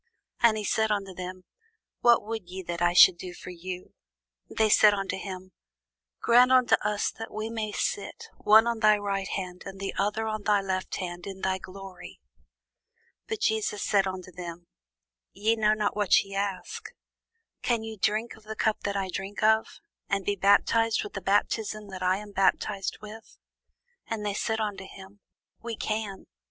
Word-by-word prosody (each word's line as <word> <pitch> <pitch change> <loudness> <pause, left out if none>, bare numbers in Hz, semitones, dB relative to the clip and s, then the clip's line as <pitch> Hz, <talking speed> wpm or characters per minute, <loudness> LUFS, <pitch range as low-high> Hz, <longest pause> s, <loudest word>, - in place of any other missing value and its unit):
And 225 -2 +5
he 215 - -3
said 220 +1 +1
unto 195 -2 -2
them, 185 0 -7 0.6
What 240 -2 +5
would 220 -5 -5
ye 190 +1 -6
that 170 0 -5
I 175 0 +3
should 175 0 +8
do 180 -1 -7
for 180 - -9
you? 180 +1 -7 0.6
They 220 - +2
said 210 0 +6
unto 195 -1 -2
him, 185 -1 -7 0.7
Grant 245 +2 +6
unto 255 -2 +5
us 210 0 0
that 225 - -8
we 215 +1 -4
may 220 -2 -3
sit, 200 - -3
one 220 +2 +6
on 235 -1 -1
thy 215 -1 +5
right 200 -1 -2
hand, 180 -2 -5
and 195 0 -9
the 195 0 -3
other 210 +2 0
on 215 -1 -3
thy 205 0 +3
left 190 -1 -3
hand, 175 -1 -5
in 190 -1 -7
thy 190 0 0
glory. 190 -1 -10 1.1
But 220 - -4
Jesus 215 -2 0
said 195 -2 +2
unto 185 -1 -6
them, 175 -1 -8 0.7
Ye 215 +4 +1
know 215 -1 +3
not 210 -1 -1
what 205 -3 +4
ye 195 0 -11
ask: 205 - -3 0.7
can 235 -2 0
ye 220 0 -6
drink 215 +3 0
of 220 - -16
the 220 0 -6
cup 220 0 +1
that 200 0 -2
I 195 -1 -1
drink 195 +3 -5
of? 220 +1 +2 0.3
and 195 -2 0
be 205 - +1
baptized 210 +3 +3
with 210 - -8
the 195 - -5
baptism 210 +1 0
that 190 -1 -8
I 185 +1 +2
am 210 0 -9
baptized 195 0 0
with? 215 +1 -11 0.7
And 220 -2 -3
they 205 - -1
said 220 +2 -1
unto 200 -3 -3
him, 195 +1 -13 0.4
We 230 -1 -5
can. 215 -3 -3
205 Hz, 180 wpm, -27 LUFS, 190-220 Hz, 1.1 s, should